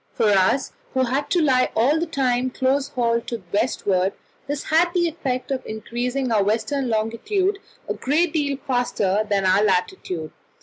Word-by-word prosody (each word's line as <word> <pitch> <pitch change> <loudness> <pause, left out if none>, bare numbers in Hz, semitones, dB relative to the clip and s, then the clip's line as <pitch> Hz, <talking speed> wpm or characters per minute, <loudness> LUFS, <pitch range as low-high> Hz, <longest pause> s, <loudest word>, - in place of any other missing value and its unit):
For 220 - +2
us, 200 +7 +2 0.2
who 260 - +3
had 265 +3 -1
to 360 - +2
lie 255 -3 +3
all 270 +8 +3
the 340 - -1
time 255 -4 0
close 265 +2 0
hauled 235 -4 0
to 235 - -3
the 205 - -20
westward, 200 -4 +1 0.3
this 285 0 -3
had 335 +2 +3
the 345 -1 +3
effect 275 -5 -3
of 260 -1 -2
increasing 245 +4 -3
our 210 -3 +3
western 240 +6 0
longitude 240 - 0 0.3
a - - -1
great 305 +5 +1
deal 285 -4 0
faster 215 -6 +1
than 200 -2 +1
our 190 +2 +4
latitude. 180 - -1
255 Hz, 170 wpm, -22 LUFS, 215-285 Hz, 0.3 s, our